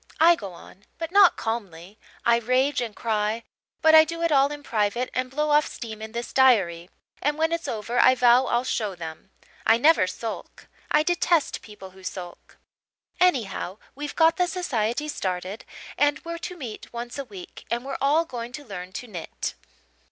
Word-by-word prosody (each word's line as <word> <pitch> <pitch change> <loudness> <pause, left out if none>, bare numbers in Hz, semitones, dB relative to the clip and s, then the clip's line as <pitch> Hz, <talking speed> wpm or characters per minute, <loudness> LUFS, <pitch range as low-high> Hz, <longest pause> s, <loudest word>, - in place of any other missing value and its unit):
I 340 +2 +7
go 200 - -7
on 190 +3 -15
but 330 0 -5
not 395 -2 +6
calmly 200 -4 -5 0.3
I 235 0 +5
rage 255 +3 +1
and 230 -3 -4
cry 220 0 -1 0.4
but 315 0 +6
I 315 0 +10
do 335 +1 -5
it 335 - +2
all 280 0 +4
in 290 0 -7
private 225 +1 -1
and 255 0 -1
blow 300 +3 -1
off 295 +1 +4
steam 220 -2 -8
in 220 0 -7
this 235 +1 -5
diary; 190 -10 +3 0.3
and 295 +1 0
when 320 +1 +1
it's 335 0 -2
over 230 +2 -2
I 255 - +6
vow 245 +1 +5
I'll 240 +1 +1
show 215 -6 -2
them. 160 +1 -8 0.3
I 225 - +5
never 295 - +5
sulk. 220 +5 -7 0.2
I 300 - +4
detest 345 -1 +1
people 205 -3 -12
who 190 +1 -16
sulk. 180 -1 -8 0.6
Anyhow, 225 - +1 0.2
we've 290 +1 -6
got 325 0 +4
the 360 -1 +2
society 285 - -1
started 185 -5 -4 0.3
and 290 0 +3
we're 335 0 -5
to 360 - -10
meet 240 -9 -8
once 240 +3 -6
a - - -2
week, 195 -6 -11
and 240 +2 -2
we're 275 - -4
all 300 +4 +3
going 240 -4 -6
to 290 +1 -8
learn 185 -3 -8
to 250 - -6
knit. 180 -7 -5
240 Hz, 185 wpm, -25 LUFS, 210-295 Hz, 0.6 s, I